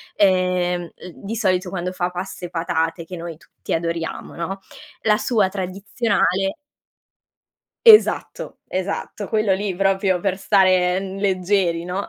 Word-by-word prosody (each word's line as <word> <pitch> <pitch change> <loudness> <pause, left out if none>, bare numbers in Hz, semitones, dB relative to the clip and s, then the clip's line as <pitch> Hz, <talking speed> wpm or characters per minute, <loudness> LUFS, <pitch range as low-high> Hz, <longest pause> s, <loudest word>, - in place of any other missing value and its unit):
ehm, 180 -3 +1
l 180 - -11
di 210 +3 -6
solito 185 -4 0
quando 180 -1 -3
fa 180 -1 -2
pasta 180 0 -6
e - - -7
patate 165 0 -2
che 180 - -8
noi 165 -2 -7
tutti - - -8
adoriamo, 165 0 -3
no, 190 +4 -4 0.4
la 210 -1 +3
sua 220 -6 +1
tradizionale 195 - -1 1.3
Esatto, 435 -2 +5
esatto, 195 +2 -4
quello 215 -3 +1
lì 195 -1 -2
proprio 190 -1 +1
per 195 -1 -1
stare, 185 -2 +3
mhmm, 195 0 -6
leggeri, 185 -3 +1
no. 185 +3 -3
185 Hz, 135 wpm, -21 LUFS, 180-195 Hz, 1.3 s, Esatto